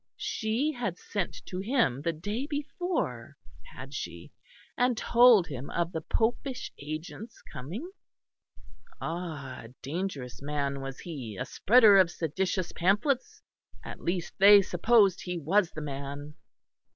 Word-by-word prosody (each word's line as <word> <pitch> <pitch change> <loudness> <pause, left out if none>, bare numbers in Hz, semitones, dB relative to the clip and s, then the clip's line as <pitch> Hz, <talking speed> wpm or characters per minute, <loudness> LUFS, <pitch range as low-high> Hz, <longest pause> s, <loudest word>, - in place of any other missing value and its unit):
She 230 +8 -1
had 235 - -3
sent 200 -4 -4
to 185 - -5
him 200 - +1
the 170 - 0
day 205 - -4
before, 320 +5 -3 0.3
had - - -10
she, - - -6 0.4
and 245 -1 +2
told 235 -5 +6
him 135 -4 -7
of 170 0 -1
the 160 - -3
popish 245 - -1
agent's 155 +10 -7
coming? 175 - -7 1.1
Ah! 160 -6 -5
A 120 +3 -14
dangerous 145 -5 -4
man 140 -1 -2
was 135 -1 -6
he, 130 - -7
a - - -2
spreader 220 -3 +6
of 185 -3 +5
seditious 180 +3 -2
pamphlets? 260 - 0 0.4
At - - -8
least 175 -1 -2
they 200 +1 +9
supposed 195 +1 +3
he 180 -1 -4
was 175 +4 +2
the 155 - -7
man. 140 +1 -6
180 Hz, 130 wpm, -29 LUFS, 150-225 Hz, 1.1 s, they